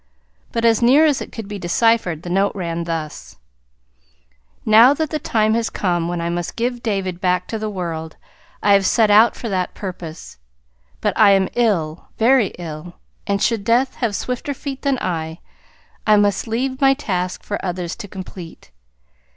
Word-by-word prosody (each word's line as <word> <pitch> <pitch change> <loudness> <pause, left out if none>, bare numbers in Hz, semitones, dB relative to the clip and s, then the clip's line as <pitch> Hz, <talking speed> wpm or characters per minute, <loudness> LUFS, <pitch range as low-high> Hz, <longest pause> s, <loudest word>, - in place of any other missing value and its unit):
But 230 0 -1
as 225 -1 +4
near 270 +7 +6
as 295 -4 +2
it - - -7
could 225 -3 -7
be 205 -1 -6
deciphered, 180 -2 +1
the 175 - -6
note 195 +2 +2
ran 170 -3 -3
thus: 160 -3 -5 1.3
Now 230 +6 +7
that 315 0 -2
the 310 - -1
time 220 -4 +1
has 230 0 0
come 175 -3 -1
when 175 0 -3
I 170 - -2
must 175 0 -3
give 240 +1 -2
David 190 -5 -2
back 180 0 +1
to 220 - -3
the 215 0 -3
world, 165 -5 -5 0.5
I 205 - +5
have 195 -1 +4
set 220 -3 +3
out 220 +3 +6
for 235 - -6
that 185 -2 -2
purpose. 175 - -8 0.6
But - - 0
I 205 -2 +6
am 190 -1 +2
ill 175 -10 0
very 240 -1 +4
ill, 170 0 -8 0.3
and 200 -1 0
should 230 -4 +1
Death 240 +4 +2
have 230 -5 -1
swifter 250 +5 -3
feet 275 0 -6
than 275 -2 +1
I, 160 -5 -3 0.7
I 215 -1 +6
must 205 0 +1
leave 260 +4 -2
my 270 0 +5
task 185 -9 -3
for 205 - -4
others 180 -2 -3
to 215 - -8
complete. 180 - -10
200 Hz, 175 wpm, -20 LUFS, 175-230 Hz, 1.3 s, Now